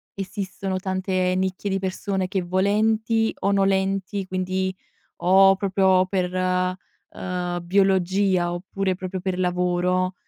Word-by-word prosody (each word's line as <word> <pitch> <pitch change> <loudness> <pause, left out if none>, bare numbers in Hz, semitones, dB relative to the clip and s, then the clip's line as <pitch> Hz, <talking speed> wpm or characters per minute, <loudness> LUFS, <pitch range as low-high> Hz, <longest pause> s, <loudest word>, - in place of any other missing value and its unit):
esistono 195 0 -4
tante 185 -1 -1
nicchie 190 +2 -2
di 195 - 0
persone 190 0 -2
che 190 0 -1
volenti 215 +5 +1
o 200 - +1
nolenti, 195 0 0
quindi 185 0 -2 0.4
o 195 +1 +5
proprio 190 -1 +2
per, 185 -1 -1
ehm, 180 -1 -3
biologia 190 -1 +2
oppure 190 +2 -2
proprio 185 0 -5
per 185 -1 -2
lavoro, 180 0 0
185 Hz, 110 wpm, -23 LUFS, 185-195 Hz, 0.4 s, o